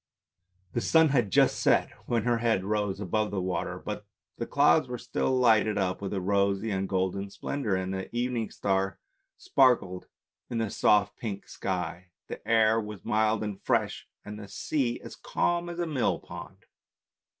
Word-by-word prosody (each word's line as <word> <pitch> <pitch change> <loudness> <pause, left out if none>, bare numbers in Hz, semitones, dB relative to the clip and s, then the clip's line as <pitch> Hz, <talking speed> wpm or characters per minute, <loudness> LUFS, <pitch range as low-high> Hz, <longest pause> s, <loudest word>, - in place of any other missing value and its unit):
The - - 0
sun 160 -1 +5
had 120 -7 +2
just - - +4
set - - +3 0.2
when 115 -3 +1
her 120 0 +1
head 115 -5 +1
rose 105 -1 -1
above 105 +2 0
the 100 - -2
water, 90 -1 -2
but - - -6 0.3
the - - -4
clouds 80 +10 +4
were 125 0 -4
still 130 +2 -1
lighted 110 -4 +4
up 95 -1 -1
with 100 - -4
a 100 - -1
rosy 100 +2 +1
and 95 0 -1
golden 95 +1 -1
splendour, 110 -1 -2
and 95 0 -2
the 95 0 -4
evening 120 -2 -1
star 95 -1 -1 0.4
sparkled 125 - +2 0.4
in 120 - -3
the 110 -3 -1
soft 105 -2 +3
pink 105 -4 -5
sky, 90 -1 -4 0.2
the - - -8
air 110 0 +4
was 105 -2 -8
mild 110 -1 +2
and 105 -2 -5
fresh, - - 0 0.2
and 105 0 -7
the 100 - -8
sea 120 +4 -1
as - - -9
calm 175 0 -1
as 170 - -6
a 175 - 0
millpond. 95 - -3
105 Hz, 170 wpm, -28 LUFS, 95-120 Hz, 0.4 s, sun